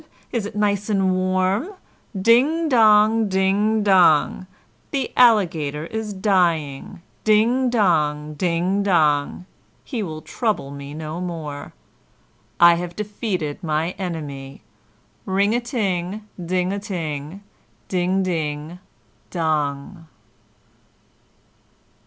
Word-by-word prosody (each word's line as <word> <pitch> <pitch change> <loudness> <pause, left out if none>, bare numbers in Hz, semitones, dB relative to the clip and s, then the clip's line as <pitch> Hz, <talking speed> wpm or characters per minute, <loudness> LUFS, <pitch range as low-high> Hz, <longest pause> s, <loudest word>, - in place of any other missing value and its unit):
Is 225 -4 -2
it 210 - -11
nice 205 0 0
and 195 -3 +2
warm? 185 - 0 0.4
Ding 265 - +3
dong! 220 -3 +4
ding 200 +3 +1
dong! 185 -2 +4 0.4
The 275 -2 -3
Alligator 165 - +3
is 220 +3 -5
dying! 175 -7 0 0.2
ding 235 +4 +3
dong, 155 -9 +1
ding 180 +4 0
dong! 160 -3 +1 0.4
He 245 -5 -4
will 155 -5 -6
trouble 215 - -2
me 140 +1 -8
no 155 +2 -5
more. 155 -5 -6 0.8
I 170 0 +8
have 175 -1 -6
defeated 200 -7 -4
my 160 +1 -1
enemy! 145 -7 -6 0.6
Ring 200 +3 +2
a 240 - +1
ting! 210 -4 -3 0.2
ding 180 +2 -1
a 200 - -3
ting! 165 -3 -5 0.4
ding 185 +1 0
ding 160 -1 -3 0.5
dong!" 155 0 -2
185 Hz, 100 wpm, -21 LUFS, 155-210 Hz, 0.8 s, I